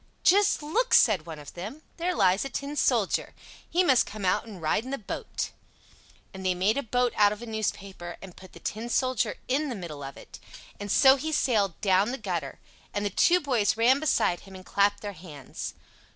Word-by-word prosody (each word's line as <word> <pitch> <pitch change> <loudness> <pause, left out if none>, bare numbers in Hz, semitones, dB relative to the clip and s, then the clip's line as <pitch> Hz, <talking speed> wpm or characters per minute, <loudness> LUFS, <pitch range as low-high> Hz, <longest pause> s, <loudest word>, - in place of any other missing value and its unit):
"Just 400 -3 +4
look!" 455 +12 +2
said 190 -8 +4
one 160 -2 -7
of 145 -1 -11
them, 215 - -8
"there 355 +1 -1
lies 190 +1 +3
a 275 - -4
tin 285 +2 -4
soldier. - - +1 0.3
He 360 +2 +3
must 265 -8 +4
come 205 -2 -6
out 185 +5 +1
and 205 -5 -9
ride 160 +7 0
in 255 - -8
the 275 - -2
boat." 210 - -5 0.8
And 190 0 -8
they 185 -1 +1
made 195 +5 +2
a 280 - 0
boat 245 0 0
out 205 -1 +5
of 210 +2 -6
a - - -5
newspaper, 200 -5 -4
and 190 -3 -11
put 185 - -14
the - - -12
Tin 225 +3 -4
Soldier 255 0 +1
in 285 +3 0
the 245 - -3
middle 165 -7 -7
of 135 0 -8
it; - - -12 0.4
and 205 -1 -4
so 270 0 +6
he 315 +4 -3
sailed 210 - +1
down 195 +2 +3
the 260 - -3
gutter, 175 - -4 0.4
and 205 0 -1
the 205 - -1
two 355 - +4
boys 245 -10 +1
ran 250 +4 +4
beside 270 - +1
him 195 -1 -14
and 185 0 -11
clapped 205 0 +2
their 205 -1 -5
hands. 155 -7 -8
210 Hz, 210 wpm, -27 LUFS, 185-265 Hz, 0.8 s, so